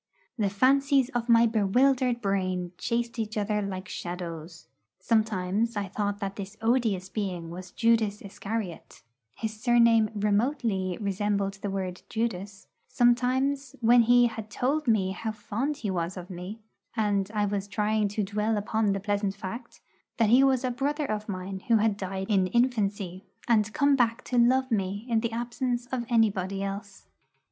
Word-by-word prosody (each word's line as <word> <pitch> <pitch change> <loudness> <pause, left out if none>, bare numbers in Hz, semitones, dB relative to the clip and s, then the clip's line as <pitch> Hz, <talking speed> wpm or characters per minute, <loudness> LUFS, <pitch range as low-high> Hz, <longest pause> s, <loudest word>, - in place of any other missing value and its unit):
The 210 -5 0
fancies 270 +5 +3
of 240 -2 -3
my 230 0 +6
bewildered 245 +3 +2
brain 185 -3 -1
chased 235 0 -2
each 220 0 -3
other 210 0 0
like 190 -2 -5
shadows. 170 -1 -6 0.3
Sometimes 215 +1 0
I 200 -2 -2
thought 205 +1 -2
that 195 -1 -5
this 200 +1 -7
odious 225 -5 +1
being 185 -5 -4
was 180 +1 -8
Judas 225 -2 +2
Iscariot 200 -2 -6 0.3
(his 215 -1 -5
surname 235 -2 +4
remotely 205 -3 0
resembled 200 -1 -1
the 205 - -2
word 185 -2 -4
'Judas'); 205 -3 -3 0.2
sometimes 255 +3 +1
when 240 +1 +6
he 245 +1 +5
had 220 -2 -4
told 275 +7 -1
me 200 -5 +2
how 220 +4 -4
fond 235 +7 -3
he 210 -8 -3
was 175 +1 -2
of 180 +1 -8
me, 180 +4 -7 0.4
and 205 -3 +1
I 210 -1 +2
was 200 -1 -2
trying 210 0 +1
to 205 +1 -2
dwell 210 +2 -1
upon 210 0 0
the 195 - -2
pleasant 200 0 -1
fact 230 +5 -8 0.4
that 225 -2 +3
he 255 +3 +7
was 265 -2 +3
a 255 - 0
brother 285 +4 -1
of 215 -3 -3
mine 190 0 -4
who 230 -2 +5
had 215 -1 +2
died 190 -1 -4
in 195 -4 +2
infancy, 200 -5 0 0.2
and 215 -2 +3
come 285 +1 +3
back 240 -1 +1
to 245 - 0
love 260 +2 +3
me 200 0 -1
in 230 -2 +2
the 230 0 -2
absence 240 +1 -2
of 245 -3 -2
anybody 200 -4 +1
else. 200 +1 -6
215 Hz, 160 wpm, -27 LUFS, 195-235 Hz, 0.4 s, he